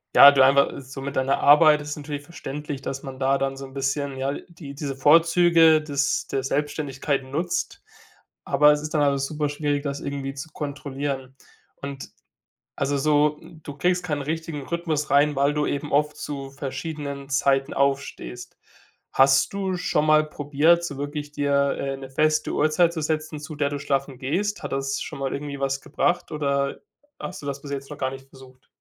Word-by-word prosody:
ja 140 - +11
du 135 -1 +3
einfach 140 +1 +4
so 135 +1 -9
mit 140 +1 -5
deiner 130 +1 +1
Arbeit 150 +1 +7
ist 150 0 -5
natürlich 145 -1 -6
verständlich, 145 -3 -6
dass 135 0 -5
man 135 -1 -8
da 135 +1 +2
dann 135 0 -1
so 135 0 -8
'n 135 - -13
bisschen, 135 0 -2
ja, 135 +1 -1
l - - -6
die 150 -5 -10
diese 140 -1 -4
Vorzüge 165 +2 +5
des 145 -2 0
der 135 - -1
Selbstständigkeit 145 0 -1
nutzt, 175 - -3 0.6
aber 150 0 +5
es 150 0 +1
ist 155 +1 -6
dann 150 - +3
alles 140 -1 +1
super 150 -1 -2
schwierig, 145 -1 -1
das 140 -1 -3
irgendwie 140 -1 -4
zu 140 +3 -8
kontrollieren. 140 -2 -5 0.4
Und 140 -1 -7 0.7
also 140 0 0
so, 150 +1 +2
du 160 -4 -11
kriegst 180 +3 +1
keinen 150 -4 -2
richtigen 160 -1 -4
Rhythmus 165 -3 -2
rein, 145 +1 +4
weil 140 +1 +3
du 150 0 0
eben 145 +1 -3
oft 150 +1 +2
zu 135 -2 -5
verschiedenen 140 0 -5
Zeiten 135 +1 +1
aufstehst. 140 - -2 0.6
Hast 135 0 +4
du 190 -2 -1
schon 175 -4 0
mal 155 0 +5
probiert, 155 +4 +2
so 140 -4 -6
wirklich 145 +1 -5
dir, 140 -1 +1
äh, 135 0 -3
'ne 135 -1 -9
feste 155 +3 +1
Uhrzeit 160 +3 +3
zu 160 - -3
setzen, 155 0 -2
zu 155 0 -7
der 145 -1 +1
du 145 - -3
schlafen 135 -2 -2
gehst? 190 +10 -2
Hat - - -5
das 135 0 -2
schon - - -6
mal 135 -1 -2
irgendwie 140 -1 -5
was 135 0 -1
gebracht 175 +4 -1
oder 140 -2 -1 0.4
hast 185 -2 -6
du - - -10
das 140 0 -4
bis 140 - -9
jetzt 140 0 -5
noch 150 - -7
gar 130 -1 0
nicht 135 0 -10
versucht? 130 -1 -17
145 Hz, 185 wpm, -24 LUFS, 135-155 Hz, 0.7 s, ja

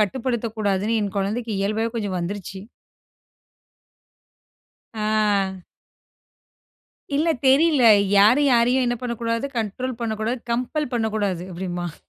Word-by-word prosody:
கட்டுப்படுத்தக்கூடாதுன்னு 220 -2 -1
என் 200 -1 -4
கொழந்தைக்கு 220 +4 -2
இயல்பாவே 215 +3 -1
கொஞ்சம் 205 -4 -2
வந்துருச்சு. 190 +1 -6 2.3
ஆ. 210 -3 0 1.5
இல்ல, 310 +4 +1 0.2
தெரியல. 280 0 +4 0.3
"யாரும் 230 +9 +5
யாரையும் 245 +2 +3
என்ன 240 0 0
பண்ண 245 -1 -2
கூடாது? 230 +3 -1
கண்ட்ரோல் 230 +3 -4
பண்ண 225 -1 -1
கூடாது, 235 +4 -1
கம்பெல் 255 +4 -2
பண்ணக்கூடாது." 215 -6 -1
அப்படிம்பான். 175 -2 -5
220 Hz, 100 wpm, -22 LUFS, 200-245 Hz, 2.3 s, யாரும்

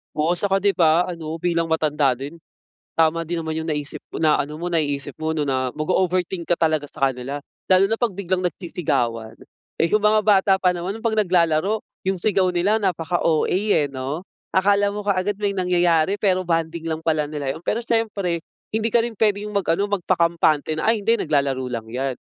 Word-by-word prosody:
Oo, 160 +3 +1
saka 195 +1 +1
'di 200 0 +1
ba 170 0 +4
ano, 165 -2 -5
bilang 170 -1 0
matanda 150 -4 +2
din 135 +6 -6 0.6
tama 165 +1 +3
din 170 +1 -3
naman 160 -1 -3
yung 160 - -4
naisip 150 -1 -4 0.2
na 155 -2 +3
ano 150 +2 -7
mo, 175 +1 -4
naiisip 145 -3 -1
mo 160 - -1
na 135 -5 0
mag-o-overthink 180 +2 0
ka 175 - +3
talaga 155 -3 0
sa 135 - +1
kanila 130 +2 -4 0.3
lalo 185 +1 +6
na 225 - 0
'pag 235 -2 0
biglang 185 -1 -2
nagsisigawan. 120 -11 -2 0.4
Eh, 165 - +3
yung 215 +4 +2
mga 215 0 +5
bata 200 -2 +4
pa 180 -1 +3
naman 185 +5 -4
'pag 225 -1 -1
naglalaro, 180 +3 +2 0.2
yung 190 -1 -1
sigaw 190 -2 +2
nila 180 +4 +2
napaka 175 -2 -1
OA, 160 -2 +2
eh, 190 -6 +2
'no. 140 +6 -5 0.3
Akala 200 +1 +3
mo 205 0 -6
kaagad 200 0 0
may 205 -1 0
nangyayari, 180 0 +2
pero 185 -3 +2
bonding 165 -1 -2
lang 160 0 -2
pala 155 -2 +1
nila 145 -3 -3
yun. - - -10
Pero 220 - 0
siyempre, 205 -7 -1 0.3
hindi 220 +1 0
ka 235 0 +4
rin 240 - -5
pwedeng 210 0 0
mag 200 - 0
ano, 200 +5 +1
magpakampante 170 -5 +1
na, 160 +7 0
"Ay, 225 - 0
hindi. 230 - +4
Naglalaro 140 - 0
lang 115 -2 -4
'yan." 130 +3 -3
170 Hz, 190 wpm, -22 LUFS, 155-195 Hz, 0.6 s, lalo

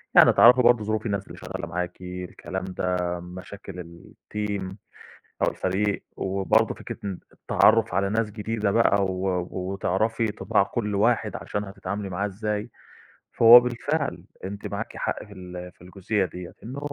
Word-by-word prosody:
يعني - - +8
تعرفي 125 +2 +7
برضه 120 -2 +5
ظروف 110 +1 -2
الناس 100 -2 -2
اللي - - -11
شغالة - - -6
معاكِ، 90 +1 -4
الكلام 90 +1 -6
ده، 90 -1 -1
مشاكل 90 +1 -9
الteam 95 +3 -6 0.7
أو - - +4
الفريق، 100 +2 -1
وبرضه 100 +3 +1
فكرة - - -7
ان 95 -3 -4
التعرُّف 110 -3 +3
على 95 +1 +1
ناس 110 0 0
جديدة 105 -1 -1
بقى، 100 -3 +4
و 95 -1 -1
وتعرَفي 100 +4 -1
طباع 100 - +1
كل 105 -2 -2
واحد 110 -1 +2
عشان 105 - -3
هتتعاملي 100 0 -5
معاه 95 +3 -1
إزاي، 105 +3 -3 0.6
فهو 120 +1 +10
بالفعل 140 +5 -2 0.2
أنتِ 100 +2 -5
معاكِ - - -5
حق - - -2
في 105 - -13
ال 90 -1 -8
في - - -28
الجزئية 95 +2 -1
ديَّة، 90 0 -8
إنه 130 +5 -6
100 Hz, 150 wpm, -25 LUFS, 90-110 Hz, 0.7 s, فهو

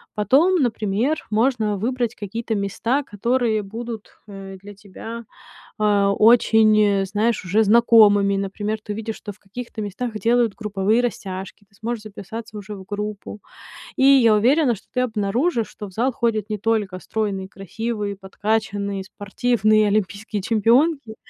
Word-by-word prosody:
Потом, 275 - +3
например, 225 +4 -1
можно 220 -2 +1
выбрать 240 +2 -1
какие-то 225 +3 -4
места, 230 +7 -1
которые 230 0 0
будут, 225 +2 -8
э, 195 -1 -9
для 205 +1 -11
тебя, 225 +3 -9 0.5
а, 205 -2 +2
очень, 220 -1 +5
э, 200 -2 +2
знаешь, 210 +2 0
уже 210 +5 +3
знакомыми. 210 -3 +5
Например, 205 +2 -3
ты 210 - -5
увидишь, 220 +1 -5
что 205 -2 -8
в - - -27
каких-то 220 +2 -8
местах 210 +4 -4
делают 235 -2 +2
групповые 210 +1 0
растяжки, 195 -4 -5
ты 200 - -28
сможешь 225 +1 -4
записаться 215 +2 -8
уже 210 +1 -7
в 190 -1 -11
группу. 210 0 -6 0.5
И 265 - 0
я 260 -6 +6
уверена, 250 +4 +3
что 200 - -17
ты 250 - +1
обнаружишь, 230 - 0
что 210 - -9
в - - -13
зал 250 +6 +1
ходят 220 -3 -1
не 210 -2 -3
только 205 -4 -1
стройные, 200 -3 -3
красивые, 205 +2 -4
подкачанные, 200 0 -2
спортивные 215 +2 +1
олимпийские 205 0 -2
чемпионки, 235 +3 +2
215 Hz, 145 wpm, -22 LUFS, 200-235 Hz, 0.5 s, я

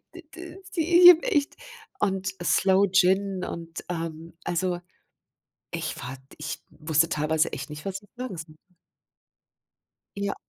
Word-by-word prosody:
d 350 - -10
d 355 +2 -10
die 345 +1 +4
ich 355 - +13
habe 340 -2 +7
echt 300 - 0 0.4
und 195 -2 0
Sloe 190 +2 +3
Gin 190 0 +3
und 165 -1 -7
ähm, 165 -1 -5
also 175 0 -1 0.9
ich - - -3
war 130 +2 -6 0.2
ich 150 0 -5
wusste 160 +1 +1
teilweise 155 +1 +1
echt 135 0 -6
nicht, 150 0 -8
was 195 0 -4
ich 205 - -22
sagen 250 -8 -5
sollte. 160 -1 -9 1.6
Ja. 200 0 -2
185 Hz, 135 wpm, -26 LUFS, 160-205 Hz, 1.6 s, ich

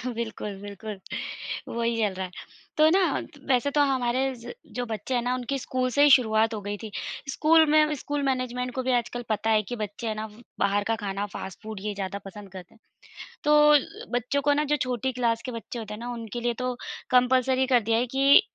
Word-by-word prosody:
बिल्कुल, 220 -3 -4
बिल्कुल। 205 0 -7 0.8
वही 235 0 0
चल 210 -3 +1
रहा 190 0 -3
है। 180 - -10 0.5
तो 310 0 +6
ना 380 +4 +4 0.5
वैसे 260 +3 +2
तो - - +6
हमारे 255 0 +1
ज 240 0 -9 0.2
जो 245 - -1
बच्चे 225 +2 -3
है 240 - +2
ना, 245 +1 0
उनकी 255 +2 -2
स्कूल 255 0 -1
से 285 - +6
ही 295 - +7
शुरुआत 220 -2 +2
हो 215 - -3
गयी 205 +1 -4
थी। 220 - -6 0.4
स्कूल 320 +3 +5
में 305 0 +5
स्कूल 290 +1 -3
मैनेजमेंट 250 -1 -2
को 260 - -1
भी - - +3
आजकल 240 +1 -5
पता 220 0 0
है 215 -1 +4
कि 245 - -2
बच्चे 210 +3 -5
हैं 215 - -1
ना, 215 +1 -4 0.3
बाहर 200 +1 +2
का - - +2
खाना, 200 0 -2
फास्ट 190 - -6
फूड 215 -2 -6
ये 210 0 -2
ज़्यादा 195 0 -4
पसंद 195 0 -10
करते 185 -2 -11
हैं। - - -24 0.6
तो 300 0 +5 0.2
अ, - - +10 0.4
बच्चों 250 +4 -1
को - - +6
ना 295 +1 +2
जो - - +3
छोटी 250 +1 -1
क्लास 230 -2 +1
के 255 - -4
बच्चे 230 +1 -6
होते 215 -2 -6
हैं 210 - -7
ना 240 +1 -5
उनके 230 0 -6
लिए 240 0 +1
तो 250 0 -1 0.4
कंपल्सरी 255 +1 +4
कर 245 - +7
दिया 225 - +4
है - - -4
कि, 275 +6 +7
240 Hz, 220 wpm, -26 LUFS, 215-260 Hz, 0.8 s, अ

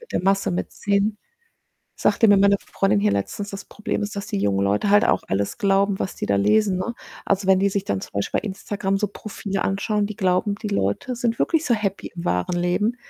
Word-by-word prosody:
Mit 475 - -15
der - - 0
Masse 195 +1 +2
mitziehen. 200 +3 -1 0.8
Sagte 225 - +3
mir 205 - +6
meine 200 +1 +5
Freundin 195 - 0
hier 105 0 +2
letztens, 150 - -3
das 195 -1 -7
Problem 210 0 -3
ist, 205 0 -4
dass 200 0 -4
die 205 - -2
jungen 100 - +1
Leute 100 - +1
halt 205 +2 +6
auch - - +2
alles 100 +1 -1
glauben, 195 0 +2
was 185 - -3
die - - -3
da 100 - +2
lesen, 185 - +3
ne? 235 +6 -3 0.3
Also, 195 0 +1
wenn 190 -1 +5
die 200 +1 +3
sich 200 0 -2
dann 100 - -1
zum - - -10
Beispiel 100 0 -1
bei - - -14
Instagram 195 0 -2
so 210 +1 0
Profile 200 -1 -4
anschauen, 205 +1 0
die 210 -1 -7
glauben, 185 +1 +1
die 210 0 -5
Leute 200 - -1
sind 235 -1 -1
wirklich 325 -2 +1
so 240 - +3
happy 200 -3 -3
im 170 - -5
wahren 90 - 0
Leben, 180 +7 0
195 Hz, 225 wpm, -23 LUFS, 180-210 Hz, 0.8 s, mir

